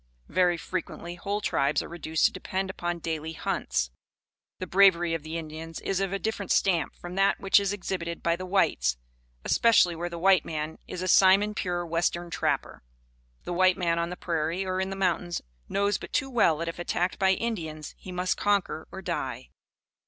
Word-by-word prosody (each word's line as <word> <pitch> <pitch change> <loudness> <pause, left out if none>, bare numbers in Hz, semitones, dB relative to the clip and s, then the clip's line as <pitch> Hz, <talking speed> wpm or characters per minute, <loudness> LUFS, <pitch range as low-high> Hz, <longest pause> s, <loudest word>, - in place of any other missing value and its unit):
Very 180 0 +3
frequently 175 0 -5
whole 200 +4 -3
tribes 140 -6 +1
are - - -8
reduced 160 -2 0
to - - +4
depend 190 0 -3
upon 175 -2 -3
daily 160 -1 -4
hunts. 60 - -1 0.7
The 185 - -4
bravery 175 -2 +4
of 165 - -2
the 160 +2 -5
Indians 160 0 -7
is 195 -1 -1
of 195 -1 -1
a 195 - 0
different 205 0 -3
stamp 175 -5 +2
from 175 0 -9
that 195 +1 +2
which 195 +1 +5
is 200 -1 -1
exhibited 180 -4 -4
by 170 0 +2
the 185 +1 -7
whites, 180 - +2 0.5
especially 220 -7 +4
where 175 +1 -3
the 170 - -6
white 185 -1 +4
man 155 0 -4
is 180 - -5
a - - -2
Simon 195 +3 +5
pure 175 -3 -2
western 170 +1 -1
trapper. - - -1 0.6
The 175 - -4
white 185 +1 +4
man 170 -2 +1
on 170 0 -1
the 180 - -6
prairie 170 +2 -1
or 185 0 -1
in 190 - -2
the 195 - -4
mountains, 180 -2 -1 0.3
knows 200 0 +1
but - - -9
too 270 -2 0
well 200 -10 +4
that 170 +1 -3
if 165 - -5
attacked 175 +2 -1
by 190 -1 +4
Indians 165 -9 -4
he 185 - -10
must 180 +1 -1
conquer 200 -6 0
or 190 - -8
die. 135 -8 -4
175 Hz, 190 wpm, -27 LUFS, 165-190 Hz, 0.7 s, which